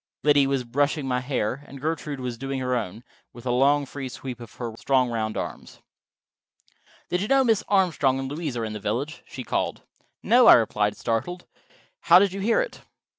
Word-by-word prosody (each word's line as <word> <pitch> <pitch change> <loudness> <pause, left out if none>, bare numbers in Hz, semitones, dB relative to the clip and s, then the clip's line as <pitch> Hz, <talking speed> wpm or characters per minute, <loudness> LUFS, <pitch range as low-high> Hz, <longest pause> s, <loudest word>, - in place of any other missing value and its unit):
Liddy 145 -2 +4
was 135 -2 0
brushing 140 +4 0
my 125 -1 0
hair, 130 0 -2
and 140 - -10
Gertrude 150 -1 -3
was 125 -2 -4
doing 135 +3 -4
her 125 -1 -1
own, 110 -1 -4 0.3
with 120 +1 -13
a 125 - 0
long 140 +3 +3
free 135 -1 -6
sweep 125 -1 -7
of 115 -2 -11
her 120 -2 -5
strong 130 0 +1
round 110 -2 -2
arms. - - -6 1.3
"Did 180 - 0
you 205 - -2
know 270 +2 +4
Mrs. 225 -4 +2
Armstrong 165 -9 +2
and 135 0 -3
Louise 145 -2 -4
are 115 - -2
in 110 - -5
the 105 - -5
village?" 125 +10 -3
she - - -7
called. - - -2 0.4
"No," 245 +1 +5
I - - +11
replied, 105 -3 +1
startled. 175 +11 -3 0.5
"How - - +6
did 195 0 +3
you 195 - -5
hear 225 - +2
it?" - - -6
135 Hz, 195 wpm, -25 LUFS, 120-155 Hz, 1.3 s, I